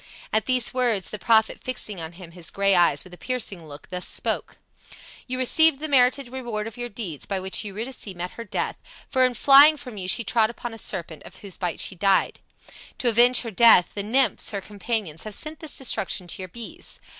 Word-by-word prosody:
At 220 -1 +2
these 255 -2 +1
words 240 -7 +1
the 210 - -6
prophet, 220 0 +3
fixing 215 -7 -3
on 160 +1 -7
him 170 -1 -12
his 170 -1 -5
gray 195 0 +2
eyes 170 -5 +3
with 185 - -15
a 180 - -13
piercing 200 -10 -4
look, 145 0 -12
thus 180 0 -2
spoke: - - -2 0.7
"You 255 0 -3
receive 310 +4 +5
the 310 +3 -5
merited 265 -1 +3
reward 240 -5 -5
of 225 - -8
your 245 0 -5
deeds, 195 - -6
by 195 -2 -2
which 190 +3 -2
Eurydice 220 +5 -5
met 175 +1 -4
her 230 - -8
death, 205 - -3 0.3
for 260 -2 +3
in 255 -1 +2
flying 285 +4 +7
from 250 -7 -9
you 185 - -5
she 230 - +1
trod 220 0 +2
upon 235 0 -7
a 225 - -10
serpent, 170 -7 -4
of - - -13
whose 195 - -4
bite 180 -3 -3
she - - 0
died. 195 +1 +1 0.6
To 245 - +1
avenge 245 +2 +5
her 230 - -6
death, 220 -4 +6
the 205 - -3
nymphs, 245 +6 +2
her 200 - -3
companions, 205 -5 -4
have 215 -2 -5
sent 310 +1 -5
this 315 -3 -5
destruction 195 -8 -2
to 175 - -5
your 185 - -7
bees. 235 - -7
220 Hz, 215 wpm, -24 LUFS, 185-250 Hz, 0.7 s, flying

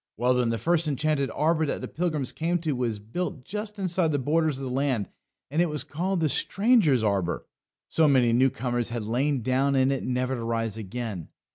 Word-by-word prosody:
Well, 125 +3 +3
then, 125 -2 +1
the 115 - 0
first 170 +3 +1
enchanted 145 -1 0
arbour 160 +2 +1
that - - -2
the - - -5
pilgrims 155 -5 -2
came 170 +2 0
to 160 -2 -1
was 120 -4 -1
built 125 - -5
just 210 0 -4
inside 180 -4 +1
the 145 - +1
borders 155 +1 +1
of 135 - -6
the 130 - -4
land, 130 -6 0 0.4
and 155 +4 +2
it 175 - +2
was 150 -3 -2
called 175 +5 -2
The 160 - +3
Stranger's 195 - +3
Arbour 100 -5 0 0.4
so 160 -1 +3
many 125 -4 +4
new 130 +3 +4
comers 120 -1 -2
had 115 -1 -3
lain 125 +4 0
down 135 +3 +2
in 130 0 +3
it 135 - -1
never 125 +1 -1
to 120 -3 -3
rise 115 -2 -1
again. 110 -4 -5
135 Hz, 210 wpm, -26 LUFS, 120-160 Hz, 0.4 s, many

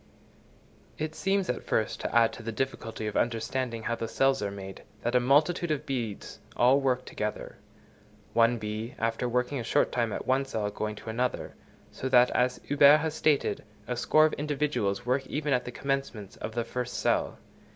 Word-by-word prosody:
It 155 0 -3
seems 195 +2 0
at - - -2
first 110 - -1
to - - -3
add 115 -1 +5
to - - -9
the 115 0 -4
difficulty 115 -2 -4
of 105 - -3
understanding 115 0 -1
how 115 - -1
the 115 -1 -3
cells 135 +2 +2
are 100 - -1
made, 95 -1 -8 0.2
that 120 - 0
a 125 - +5
multitude 150 +7 +3
of 150 -3 -1
bees 120 -7 -4 0.2
all 125 +3 +5
work 130 -1 0
together; 105 0 -5 0.8
one 115 +1 +4
bee 110 +4 -5
after 115 +2 -1
working 125 +3 0
a - - -3
short 115 - +2
time 120 -2 0
at - - -4
one 130 +1 +2
cell 110 -6 -2
going 105 +1 -3
to 110 - -7
another, 125 +3 -2 0.4
so 130 - -4
that, 125 -1 +5
as 125 0 +1
Huber 145 +1 +6
has 155 0 -2
stated, 150 -9 +1 0.2
a 125 - -2
score 155 +6 +4
of 155 - +1
individuals 145 -9 -1
work 130 +2 0
even 150 -1 -1
at 125 - +1
the 125 - -5
commencement 135 -7 -3
of 110 - -5
the 120 - 0
first 125 +1 -4
cell. - - 0
125 Hz, 190 wpm, -28 LUFS, 115-140 Hz, 0.8 s, Huber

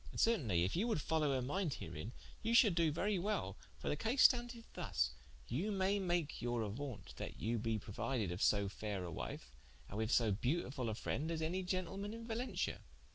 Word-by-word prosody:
And - - -7
certainly 120 - +3
if 90 - 0
you 205 +7 +2
would 220 -9 +1
followe 155 -1 +1
her 130 - 0
minde 160 +3 0
herein, 80 +7 -6 0.3
you 230 +1 +2
shall 225 -3 +8
do 165 -2 +3
very 190 +5 +1
well: 210 +4 -1 0.2
for - - -7
the - - +2
case 235 +4 +3
standeth 240 -1 +4
thus, 65 -1 0 0.4
you 170 - -1
may 195 +1 +2
make 175 -5 0
your 120 -1 0
auaunte 115 +3 -5
that - - -6
you 115 +2 0
be 115 0 0
prouided 105 0 -2
of 90 - -4
so 100 -1 +4
faire 100 -1 -3
a 85 - -5
wife, - - -5 0.4
and 105 - -4
with 110 +1 0
so 115 -4 +4
beautifull 125 - 0
a 110 - -2
frende 150 +7 -2
as 160 -1 -1
any 180 +4 0
gentleman 190 +3 -2
in 230 0 -7
Valentia." 235 +2 -2
150 Hz, 200 wpm, -38 LUFS, -, 0.4 s, shall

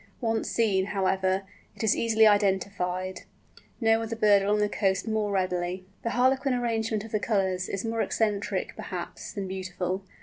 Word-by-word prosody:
Once 225 -3 -1
seen, 200 -5 +2
however, 190 -1 0 0.3
it - - -6
is 220 - +4
easily 220 -1 +4
identified—no 195 +2 0
other 225 0 -3
bird 210 -3 +5
along 205 +2 +2
the 210 0 +2
coast 195 0 0
more 215 -2 0
readily. 185 -1 -1 0.2
The 230 - -2
harlequin 260 +1 +3
arrangement 225 -3 -1
of 220 - -10
the 215 - +1
colours 185 -2 0
is 195 +2 -3
more 225 0 -1
eccentric, 210 -2 -1
perhaps, - - -6
than 200 -2 -4
beautiful. 185 0 -3
205 Hz, 155 wpm, -27 LUFS, 190-225 Hz, 0.3 s, bird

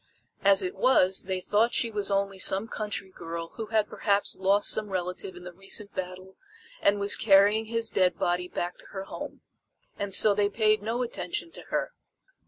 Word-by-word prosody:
As 195 0 +5
it 180 - -2
was 190 -8 +3
they 190 -1 -2
thought 215 +5 +1
she 230 - +1
was 205 -2 0
only 195 -1 -1
some 195 +3 +2
country 200 -4 -4
girl 165 -1 -6
who 220 +3 -7
had 215 -1 +1
perhaps 205 -1 0
lost 195 +2 +2
some 215 -1 0
relative 180 0 -4
in 180 - -11
the 180 0 -9
recent 195 +3 -6
battle 185 +1 -7 0.4
and 200 0 +3
was 200 0 +4
carrying 205 +1 +4
his 230 0 -1
dead 185 -1 +2
body 180 0 0
back 175 0 -4
to - - -8
her 190 -1 -4
home. - - -8 0.6
And 200 -1 -3
so 205 +2 +5
they 205 0 +1
paid 215 0 +2
no 230 +4 -2
attention 250 +6 -4
to - - -8
her. - - -2
200 Hz, 190 wpm, -27 LUFS, 185-215 Hz, 0.6 s, As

